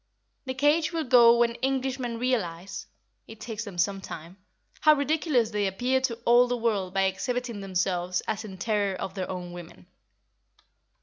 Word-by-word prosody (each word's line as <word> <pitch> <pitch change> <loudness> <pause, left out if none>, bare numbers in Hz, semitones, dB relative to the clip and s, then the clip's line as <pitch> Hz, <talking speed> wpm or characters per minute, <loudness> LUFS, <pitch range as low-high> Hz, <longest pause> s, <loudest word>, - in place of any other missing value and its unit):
The 260 0 -4
cage 300 +4 +2
will 330 -2 -1
go 240 -3 +6
when 235 0 +2
Englishmen 260 -2 -1
realise 200 -8 -2 0.4
(it 225 -1 -12
takes 220 -1 -5
them 195 -4 -9
some 195 +2 0
time) 170 0 -9 0.4
how 305 -1 +6
ridiculous 285 -5 +1
they 205 -2 0
appear 250 +7 0
to 255 -3 -1
all 240 +1 +6
the 245 0 -1
world 210 -6 -1
by 195 0 +1
exhibiting 235 +3 -2
themselves 180 -1 -1
as 215 0 -2
in 195 -3 -9
terror 205 0 0
of 185 0 -5
their 190 -2 -4
own 180 -1 -5
women. 165 - -11
225 Hz, 165 wpm, -27 LUFS, 190-250 Hz, 0.4 s, go